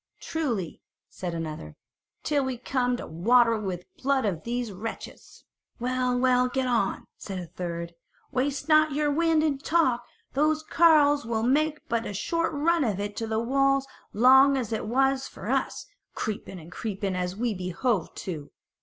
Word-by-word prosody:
"Truly," 240 - -3 0.3
said 175 -2 -5
another, 155 - -6 0.5
"till 290 -2 +1
we 260 -2 -3
come 250 0 0
to - - -6
water 230 +8 +3
it 220 - -2
with 185 -3 -3
the - - -29
blood 270 -2 +1
of 175 -6 -2
these 240 -1 -3
wretches." 210 +4 -8 0.4
"Well, 250 0 0
well, 250 0 +3
get 265 +1 -1
on," 235 -6 0
said 195 -2 -6
a 180 - -5
third, 170 0 -5 0.4
"waste 275 +2 -1
not 310 -1 +5
your 295 0 +1
wind 325 +1 +2
in 290 -3 0
talk; 275 -6 +2 0.3
those 305 +2 +2
carles 300 -3 +4
will 225 -1 -1
make 300 +5 +1
but 230 0 -1
a 205 - -5
short 335 - -1
run 320 +2 +2
of 210 -6 -1
it 205 0 -4
to 225 - -2
the 220 0 0
walls 275 +3 +2 0.3
long 265 +4 +6
as 230 -4 -2
it 215 - -3
was 270 +3 +1
for - - -6
us, - - -1 0.3
creeping 205 -3 -4
and 165 +1 -13
creeping 195 -2 -3
as 180 0 -2
we 235 +1 -1
behoved 185 +2 -1
to." 155 -6 -5
245 Hz, 170 wpm, -27 LUFS, 200-275 Hz, 0.5 s, long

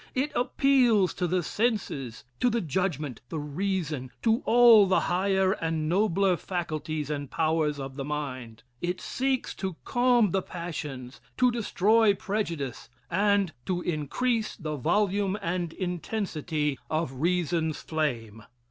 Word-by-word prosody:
It 275 +3 0
appeals 245 -7 +3
to 180 - -1
the 180 +1 0
senses 195 - -2 0.2
to 250 - +3
the 235 0 0
judgment, 155 - -2
the 160 - -4
reason, 150 -3 -2
to 225 +2 +3
all 230 -4 +7
the 185 - +3
higher 190 +1 +2
and 165 -5 -1
nobler 190 0 +2
faculties 155 -4 -3
and 145 -2 -4
powers 155 -2 0
of 135 0 -6
the 135 - -3
mind. 130 -6 -5 0.2
It 180 +1 -2
seeks 265 -1 -1
to 190 -3 -3
calm 245 -5 +3
the 190 - +1
passions, 150 -8 -6 0.2
to 250 -1 +4
destroy 220 -1 +3
prejudice 170 - -3 0.2
and 200 -1 +2
to 180 -1 -1
increase 215 - -1
the 155 -4 -4
volume 200 - +1
and 175 -3 -2
intensity 170 -5 -2
of 155 -5 -2
reason's 170 -2 0
flame. 120 -9 -2
175 Hz, 130 wpm, -27 LUFS, 150-205 Hz, 0.2 s, all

